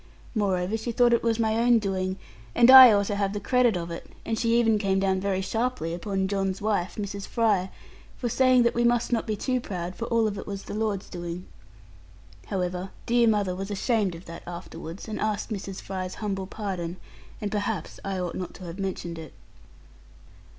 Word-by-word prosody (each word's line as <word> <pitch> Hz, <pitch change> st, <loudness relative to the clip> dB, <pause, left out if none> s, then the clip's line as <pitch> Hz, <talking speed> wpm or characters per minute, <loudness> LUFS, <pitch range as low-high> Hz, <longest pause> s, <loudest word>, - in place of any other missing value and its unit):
Moreover 195 Hz, -2 st, 0 dB
she 230 Hz, +2 st, -4 dB
thought 240 Hz, 0 st, +4 dB
it 235 Hz, -, +3 dB
was 230 Hz, -1 st, +1 dB
my 220 Hz, -1 st, +1 dB
own 240 Hz, 0 st, +5 dB
doing, 190 Hz, -3 st, -1 dB, 0.4 s
and 240 Hz, +2 st, +7 dB
I 260 Hz, -2 st, +12 dB
ought 200 Hz, -1 st, +3 dB
to 205 Hz, -, -2 dB
have 200 Hz, -1 st, 0 dB
the 205 Hz, -, -2 dB
credit 240 Hz, -1 st, +2 dB
of 170 Hz, -1 st, -5 dB
it, 170 Hz, -, -7 dB, 0.2 s
and 225 Hz, -, -1 dB
she 230 Hz, 0 st, +3 dB
even 225 Hz, -2 st, +3 dB
came 195 Hz, -2 st, +1 dB
down 190 Hz, -1 st, +1 dB
very 195 Hz, -1 st, 0 dB
sharply 225 Hz, -4 st, -2 dB
upon 190 Hz, +2 st, -2 dB
John's 195 Hz, -1 st, -1 dB
wife, 205 Hz, -4 st, -1 dB
Mrs. 200 Hz, -1 st, -5 dB
Fry, 210 Hz, -5 st, +1 dB, 0.5 s
for 245 Hz, -, -2 dB
saying 255 Hz, +1 st, +4 dB
that 235 Hz, -, +2 dB
we 240 Hz, -, +1 dB
must 240 Hz, 0 st, +2 dB
not 230 Hz, -, 0 dB
be 215 Hz, -, 0 dB
too 255 Hz, +4 st, -1 dB
proud, 180 Hz, -4 st, -5 dB
for 230 Hz, -, -4 dB
all 230 Hz, -2 st, +2 dB
of 205 Hz, -2 st, -3 dB
it -, -, -8 dB
was 200 Hz, -1 st, -5 dB
the -, -, -7 dB
Lord's 210 Hz, -2 st, -2 dB
doing. 175 Hz, +1 st, -6 dB, 1.0 s
However, 180 Hz, 0 st, -2 dB, 0.2 s
dear 235 Hz, 0 st, +3 dB
mother 205 Hz, -4 st, +1 dB
was 195 Hz, +2 st, -5 dB
ashamed 205 Hz, -2 st, 0 dB
of 165 Hz, -, -11 dB
that 170 Hz, 0 st, -9 dB
afterwards, 170 Hz, +1 st, -8 dB
and 215 Hz, -, -4 dB
asked 215 Hz, +1 st, -2 dB
Mrs. 195 Hz, -2 st, -5 dB
Fry's 185 Hz, -1 st, -4 dB
humble 195 Hz, -3 st, -3 dB
pardon; 185 Hz, -5 st, -4 dB, 0.4 s
and 205 Hz, -2 st, -3 dB
perhaps 205 Hz, -4 st, -3 dB
I 195 Hz, -1 st, -3 dB
ought 180 Hz, -2 st, -3 dB
not 185 Hz, -, -5 dB
to 185 Hz, -, -11 dB
have 175 Hz, +2 st, -7 dB
mentioned 175 Hz, -3 st, -4 dB
it. 160 Hz, -, -10 dB
200 Hz, 200 wpm, -26 LUFS, 185-225 Hz, 1.0 s, I